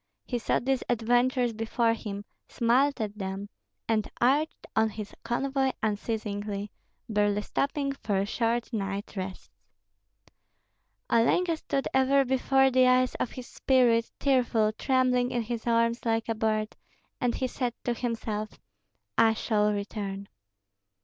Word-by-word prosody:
He 245 Hz, -, -2 dB
saw -, -, +1 dB
these 265 Hz, 0 st, 0 dB
adventures 245 Hz, +1 st, +2 dB
before 225 Hz, +1 st, +1 dB
him, 205 Hz, -3 st, -6 dB, 0.2 s
smiled 260 Hz, +4 st, +2 dB
at 210 Hz, -1 st, -4 dB
them, 195 Hz, +1 st, -4 dB, 0.4 s
and 220 Hz, -2 st, 0 dB
urged 285 Hz, +6 st, +1 dB
on 220 Hz, 0 st, +3 dB
his 210 Hz, -1 st, -7 dB
convoy 265 Hz, +2 st, 0 dB
unceasingly, 205 Hz, -1 st, -2 dB, 0.4 s
barely 205 Hz, -2 st, +1 dB
stopping 280 Hz, +2 st, -1 dB
for 200 Hz, -7 st, -1 dB
short 235 Hz, +3 st, -1 dB
night 200 Hz, -1 st, -3 dB
rests. 190 Hz, -, -6 dB, 1.6 s
Olenka 330 Hz, +9 st, +3 dB
stood 275 Hz, -3 st, -2 dB
ever 270 Hz, +1 st, +4 dB
before 265 Hz, +1 st, +3 dB
the 255 Hz, 0 st, +5 dB
eyes 255 Hz, 0 st, +4 dB
of -, -, -2 dB
his 255 Hz, -, -7 dB
spirit, 240 Hz, -4 st, +2 dB
tearful, 240 Hz, -5 st, +2 dB
trembling 250 Hz, +1 st, +1 dB
in 240 Hz, -2 st, -1 dB
his 235 Hz, +1 st, -5 dB
arms 230 Hz, 0 st, +2 dB
like 225 Hz, -1 st, 0 dB
a 225 Hz, -, +1 dB
bird, 215 Hz, -1 st, -1 dB, 0.4 s
and 245 Hz, -2 st, 0 dB
he 260 Hz, -, -1 dB
said 250 Hz, -1 st, -2 dB
to 240 Hz, -, 0 dB
himself, 225 Hz, -3 st, -4 dB, 0.6 s
"I 225 Hz, -1 st, +5 dB
shall 210 Hz, -2 st, +1 dB
return." 200 Hz, -1 st, -4 dB
230 Hz, 130 wpm, -28 LUFS, 215-255 Hz, 1.6 s, the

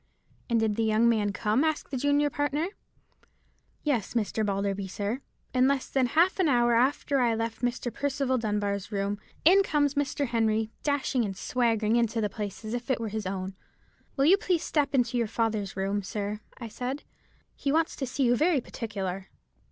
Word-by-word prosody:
'" -, -, -35 dB
"And 230 Hz, -1 st, +3 dB
did 220 Hz, -1 st, 0 dB
the 225 Hz, -, +2 dB
young 220 Hz, +1 st, +3 dB
man 215 Hz, -3 st, +2 dB
come?" 215 Hz, +6 st, +1 dB
asked 315 Hz, -1 st, -1 dB
the -, -, -2 dB
junior 285 Hz, +2 st, +2 dB
partner. 290 Hz, +5 st, -1 dB, 1.1 s
"Yes, 245 Hz, -8 st, -1 dB
Mr. 220 Hz, -1 st, 0 dB
Balderby, 200 Hz, -1 st, -1 dB
sir; 205 Hz, +7 st, -3 dB, 0.3 s
in 255 Hz, 0 st, +4 dB
less 275 Hz, -1 st, +1 dB
than 265 Hz, -2 st, +2 dB
half 345 Hz, +9 st, +3 dB
an 365 Hz, -, +4 dB
hour 240 Hz, -2 st, +4 dB
after 265 Hz, +3 st, +2 dB
I 235 Hz, -2 st, +3 dB
left 225 Hz, 0 st, -3 dB
Mr. 245 Hz, -1 st, -1 dB
Percival 275 Hz, -2 st, 0 dB
Dunbar's 205 Hz, -2 st, -2 dB
room, 200 Hz, 0 st, -1 dB, 0.3 s
in 380 Hz, +4 st, +7 dB
comes 290 Hz, -7 st, +1 dB
Mr. 285 Hz, 0 st, 0 dB
Henry, 225 Hz, -1 st, +1 dB
dashing 285 Hz, -3 st, 0 dB
and 195 Hz, -3 st, -4 dB
swaggering 230 Hz, -2 st, +1 dB
into 230 Hz, -1 st, +1 dB
the 210 Hz, -2 st, 0 dB
place 210 Hz, 0 st, -5 dB
as 215 Hz, -, -4 dB
if 245 Hz, +2 st, -4 dB
it 260 Hz, -, +1 dB
was 225 Hz, -2 st, -3 dB
his 215 Hz, -2 st, -3 dB
own. 190 Hz, 0 st, -4 dB, 0.6 s
"'Will 275 Hz, -, +3 dB
you 370 Hz, +6 st, +7 dB
please 365 Hz, -5 st, 0 dB
step 285 Hz, -3 st, 0 dB
into 245 Hz, -1 st, +2 dB
your 230 Hz, -, +1 dB
father's 215 Hz, -3 st, -1 dB
room, 195 Hz, +1 st, 0 dB
sir?' 205 Hz, +1 st, -4 dB, 0.2 s
I 235 Hz, -, -6 dB
said; 255 Hz, +6 st, -4 dB, 0.5 s
'he 280 Hz, -, -1 dB
wants 325 Hz, +2 st, +1 dB
to 270 Hz, -, -3 dB
see 270 Hz, +2 st, -1 dB
you 245 Hz, -1 st, +4 dB
very 310 Hz, +3 st, +3 dB
particular.' 195 Hz, -6 st, -5 dB
235 Hz, 190 wpm, -28 LUFS, 210-275 Hz, 1.1 s, in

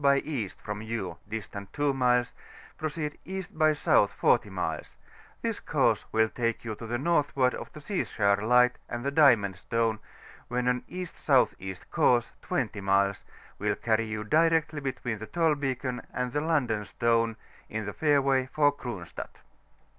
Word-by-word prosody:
by 140 Hz, -1 st, +5 dB
E. 135 Hz, -10 st, -3 dB
from 105 Hz, +2 st, -7 dB
you, 110 Hz, -6 st, -4 dB
distant 100 Hz, -2 st, -6 dB
2 145 Hz, -1 st, +1 dB
miles, 125 Hz, -2 st, +2 dB, 0.4 s
proceed 155 Hz, -1 st, -4 dB
E. 190 Hz, +1 st, -4 dB
by 155 Hz, -1 st, +3 dB
S. 150 Hz, -1 st, -2 dB
40 -, -, +3 dB
nules; 90 Hz, -5 st, -4 dB, 0.5 s
this -, -, -1 dB
course -, -, +1 dB
will 110 Hz, 0 st, +3 dB
take 115 Hz, 0 st, -2 dB
you 110 Hz, -, -3 dB
to 115 Hz, +2 st, -8 dB
the 120 Hz, +2 st, -1 dB
northward 140 Hz, -3 st, +2 dB
of -, -, -7 dB
the 155 Hz, -, -9 dB
Seaskar 110 Hz, -, +1 dB
Light 125 Hz, +2 st, +4 dB
and 120 Hz, +2 st, -4 dB
the 140 Hz, -, +1 dB
Diamond 120 Hz, -, +4 dB
Stone, 115 Hz, +2 st, 0 dB, 0.5 s
when 125 Hz, 0 st, -1 dB
an 125 Hz, 0 st, +1 dB
E.S.E. 135 Hz, -, 0 dB, 0.2 s
course, 120 Hz, -1 st, +3 dB
20 110 Hz, -5 st, -2 dB
miles, 100 Hz, 0 st, +2 dB, 0.4 s
will -, -, 0 dB
carry 115 Hz, 0 st, 0 dB
you 110 Hz, 0 st, -3 dB
directly 160 Hz, +4 st, +2 dB
between 125 Hz, -5 st, -3 dB
the 110 Hz, -, -7 dB
Tolbeacon 135 Hz, -6 st, 0 dB
and 125 Hz, -1 st, -3 dB
the 145 Hz, -, +1 dB
London 130 Hz, -10 st, +1 dB
Stone, 115 Hz, 0 st, +1 dB, 0.3 s
in 110 Hz, 0 st, -3 dB
the 105 Hz, -, -4 dB
fairway 140 Hz, -3 st, +2 dB
for 145 Hz, -1 st, +4 dB
Cronstadt. 120 Hz, -11 st, -7 dB
125 Hz, 155 wpm, -28 LUFS, 110-145 Hz, 0.5 s, by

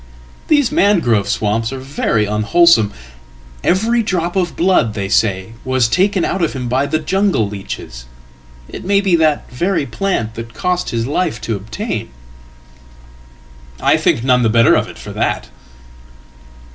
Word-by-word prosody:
These 290 Hz, -4 st, +3 dB
mangrove 165 Hz, -, +2 dB
swamps 110 Hz, +3 st, -1 dB
are 135 Hz, -, -5 dB
veryunwholesome. 115 Hz, +1 st, +2 dB, 0.7 s
Every 225 Hz, +6 st, +2 dB
drop 175 Hz, -4 st, -2 dB
of 180 Hz, -3 st, -1 dB
blood, 165 Hz, -, +2 dB
they 100 Hz, -2 st, -3 dB
say, 100 Hz, 0 st, 0 dB
was 130 Hz, -2 st, +1 dB
taken 190 Hz, -, +1 dB
out 190 Hz, -, -2 dB
of 165 Hz, -, 0 dB
him 125 Hz, -3 st, -4 dB
by 130 Hz, +4 st, 0 dB
thejungle 160 Hz, -, 0 dB
leeches. 95 Hz, -11 st, -8 dB, 0.6 s
It -, -, -9 dB
may 200 Hz, +1 st, +2 dB
be 195 Hz, -3 st, +2 dB
that 155 Hz, -2 st, +1 dB
very 170 Hz, +4 st, -1 dB
plant 160 Hz, -, -2 dB
that 115 Hz, +1 st, -9 dB
cost 180 Hz, 0 st, -1 dB
him 115 Hz, -, -2 dB
his 115 Hz, -, -1 dB
life 155 Hz, -3 st, -1 dB, 2.4 s
toobtain.""I -, -, +3 dB
think 115 Hz, -, +1 dB
none 125 Hz, -1 st, +3 dB
the 115 Hz, -, +2 dB
better 115 Hz, 0 st, +4 dB
of -, -, +1 dB
it -, -, -11 dB
for -, -, -9 dB
that."" -, -, -2 dB
135 Hz, 140 wpm, -17 LUFS, 115-185 Hz, 2.4 s, better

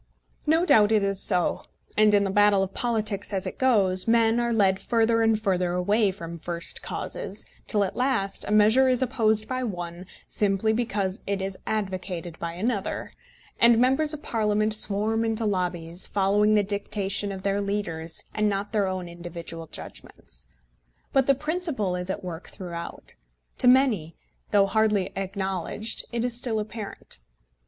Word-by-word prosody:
No 325 Hz, +3 st, +3 dB
doubt 215 Hz, -, +5 dB
it 215 Hz, -2 st, +3 dB
is 195 Hz, -1 st, -1 dB
so; 180 Hz, -1 st, 0 dB, 0.3 s
and 215 Hz, 0 st, +5 dB
in 200 Hz, -, +4 dB
the 195 Hz, -, -1 dB
battle 205 Hz, -1 st, +4 dB
of 195 Hz, -, -5 dB
politics, 215 Hz, -4 st, -1 dB
as 195 Hz, -1 st, -2 dB
it 185 Hz, -, -6 dB
goes, 200 Hz, -8 st, +3 dB
men 230 Hz, 0 st, +4 dB
are 235 Hz, 0 st, 0 dB
led 195 Hz, -4 st, +3 dB
further 230 Hz, -1 st, +2 dB
and 225 Hz, -1 st, +3 dB
further 185 Hz, -4 st, 0 dB
away 200 Hz, +4 st, +2 dB
from 170 Hz, -3 st, -7 dB
first 170 Hz, +1 st, -1 dB
causes, -, -, -4 dB, 0.2 s
till 210 Hz, -2 st, +2 dB
at 190 Hz, -, -3 dB
last 245 Hz, -7 st, 0 dB
a -, -, -3 dB
measure 220 Hz, +5 st, +5 dB
is 255 Hz, 0 st, +2 dB
opposed 220 Hz, -4 st, +1 dB
by 255 Hz, 0 st, -2 dB
one 175 Hz, -4 st, -5 dB, 0.2 s
simply 205 Hz, +1 st, +1 dB
because 205 Hz, -5 st, -1 dB
it 200 Hz, 0 st, -1 dB
is 190 Hz, 0 st, -3 dB
advocated 185 Hz, -5 st, -3 dB
by 170 Hz, 0 st, -4 dB
another, 200 Hz, +3 st, -3 dB, 0.5 s
and 235 Hz, -1 st, +6 dB
members 270 Hz, +5 st, +3 dB
of 305 Hz, -1 st, -4 dB
Parliament 215 Hz, -1 st, 0 dB
swarm 215 Hz, +2 st, +2 dB
into 225 Hz, 0 st, 0 dB
lobbies, 180 Hz, -3 st, -1 dB
following 205 Hz, +2 st, +2 dB
the 210 Hz, -, +4 dB
dictation 200 Hz, 0 st, -1 dB
of 190 Hz, -1 st, -7 dB
their 200 Hz, 0 st, 0 dB
leaders, 170 Hz, -5 st, -3 dB
and 215 Hz, -1 st, +1 dB
not 200 Hz, 0 st, -3 dB
their 205 Hz, -3 st, +2 dB
own 185 Hz, -1 st, -3 dB
individual 170 Hz, -1 st, -8 dB
judgments. -, -, -7 dB, 0.7 s
But 270 Hz, -1 st, +3 dB
the 275 Hz, -, +5 dB
principle 300 Hz, -, -2 dB
is 180 Hz, +1 st, -4 dB
at 190 Hz, +1 st, -3 dB
work 175 Hz, -1 st, -7 dB
throughout. 170 Hz, -2 st, -7 dB, 0.5 s
To -, -, +4 dB
many, 245 Hz, -, +3 dB, 0.3 s
though 200 Hz, -1 st, +4 dB
hardly 210 Hz, -2 st, +1 dB
acknowledged, 195 Hz, +2 st, -2 dB
it 235 Hz, 0 st, -1 dB
is 245 Hz, -1 st, -1 dB
still 235 Hz, -2 st, -1 dB
apparent. 210 Hz, 0 st, -5 dB
205 Hz, 165 wpm, -26 LUFS, 185-225 Hz, 0.7 s, and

